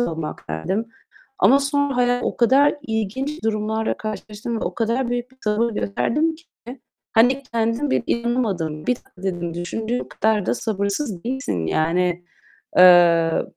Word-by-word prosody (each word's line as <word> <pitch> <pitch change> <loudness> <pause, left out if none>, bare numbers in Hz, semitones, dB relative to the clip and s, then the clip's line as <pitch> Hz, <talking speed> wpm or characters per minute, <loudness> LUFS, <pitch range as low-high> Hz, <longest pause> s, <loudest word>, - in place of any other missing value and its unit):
olmak." 165 - -4
derdim 190 - -2 0.5
ama 240 +9 +6
sonra 280 -1 0
hayat 245 0 +2
o - - -2
kadar 270 +5 +4
ilginç 230 +5 -3
durumlarla 220 0 -1
karşılaştım 215 +2 -5
ve - - -2
o - - -3
kadar 235 +2 -1
büyük 245 +1 -3
bir 260 - -24
sabır 215 +3 +1
gösterdim 300 +11 0
ki 330 +2 -19 0.7
hani 250 +4 +4
kendim 230 +5 0
bile - - +1
inanamadım. 205 -11 -1
"Bir 250 - +3
dakika." 190 -5 -19
dedim, 175 -3 -3
"Düşündüğün 220 +8 -3
kadar 215 -3 0
da - - +1
sabırsız 200 - -3
değilsin." 235 - -2
Yani, 175 - 0 0.5
eee, 170 -2 +6
220 Hz, 140 wpm, -22 LUFS, 180-245 Hz, 0.7 s, ama